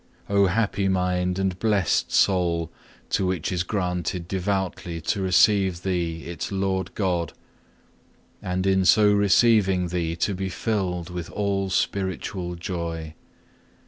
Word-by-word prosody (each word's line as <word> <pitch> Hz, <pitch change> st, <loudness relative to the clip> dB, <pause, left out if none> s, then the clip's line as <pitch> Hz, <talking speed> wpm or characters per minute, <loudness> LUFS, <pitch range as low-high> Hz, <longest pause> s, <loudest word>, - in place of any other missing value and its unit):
Oh 100 Hz, -1 st, +3 dB
happy 100 Hz, 0 st, 0 dB
mind 90 Hz, -1 st, 0 dB
and 95 Hz, -2 st, -1 dB
blessed 105 Hz, -5 st, +1 dB
soul, 85 Hz, -4 st, +2 dB, 0.4 s
to 95 Hz, -, +1 dB
which 90 Hz, -2 st, -2 dB
is 90 Hz, -2 st, 0 dB
granted 90 Hz, -2 st, -2 dB
devoutly 95 Hz, -2 st, -2 dB
to 100 Hz, +5 st, -1 dB
receive 95 Hz, -1 st, +3 dB
Thee 85 Hz, -3 st, -2 dB
its 85 Hz, +1 st, -5 dB
Lord 95 Hz, -1 st, -2 dB
God, 90 Hz, -5 st, -1 dB, 1.1 s
and 90 Hz, +1 st, -2 dB
in 95 Hz, -1 st, +3 dB
so 105 Hz, +3 st, +5 dB
receiving 100 Hz, -3 st, +3 dB
Thee 85 Hz, -2 st, -2 dB
to 100 Hz, +4 st, 0 dB
be 95 Hz, 0 st, -3 dB
filled 90 Hz, -5 st, -2 dB
with 90 Hz, -2 st, -5 dB
all 100 Hz, -2 st, -1 dB
spiritual 95 Hz, -1 st, -2 dB
joy! 85 Hz, -3 st, -5 dB
95 Hz, 125 wpm, -24 LUFS, 90-95 Hz, 1.1 s, so